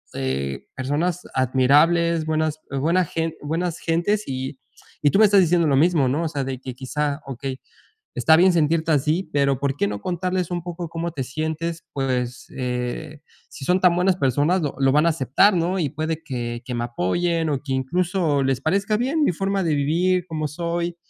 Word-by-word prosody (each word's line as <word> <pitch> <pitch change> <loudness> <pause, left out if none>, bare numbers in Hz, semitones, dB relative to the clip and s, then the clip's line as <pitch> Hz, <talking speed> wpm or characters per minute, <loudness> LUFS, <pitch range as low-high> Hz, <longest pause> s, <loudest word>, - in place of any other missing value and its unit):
eh, 70 +1 -3
personas 150 +7 -1
admirables, 150 +6 +3
buenas 155 -1 0
buena 165 +7 +1
gen 165 0 -3
buenas 165 +3 -2
gentes 175 +6 0
y 130 +1 -4 0.5
y 145 - +4
tú 195 - +3
me 215 - +8
estás 200 -1 +5
diciendo 170 -1 +3
lo 140 - +3
mismo, 155 -1 +3
¿no? 145 +6 0
O - - 0
sea, 145 -3 -3
de 130 -1 -4
que 130 0 -7
quizá, 145 +3 -3
okey, 135 0 -5 0.6
está 160 - +4
bien 185 +3 +5
sentirte 160 0 +2
así, 155 +5 +1
pero 140 -2 +2
¿por 140 -1 -1
qué 100 - +1
no 105 0 -5
contarles 180 0 -2
un 175 -1 -2
poco 175 -1 -6
cómo 165 +1 -3
te 135 - -3
sientes? 160 +4 -4
Pues, 125 -2 -2
eh, 125 +4 -4 0.3
si 135 - -9
son 180 +1 +3
tan 180 -2 +5
buenas 180 +1 +2
personas 145 +5 +2
lo 145 - -2
lo 135 -1 +3
van 150 +3 +4
a - - +5
aceptar, 160 - +3
¿no? 180 +2 0
Y 160 -5 0
puede 155 +2 -3
que 120 -5 -4
que 125 - -5
me 120 0 -1
apoyen 160 - 0
o 140 -3 -1
que 140 - -4
incluso 165 +2 0
les 135 -1 0
parezca 195 +8 +1
bien 280 +6 +1
mi - - +2
forma 195 +2 -1
de 160 -3 +1
vivir 175 +5 +1
como 155 -3 -3
soy. 170 +2 -3
155 Hz, 195 wpm, -23 LUFS, 135-175 Hz, 0.6 s, me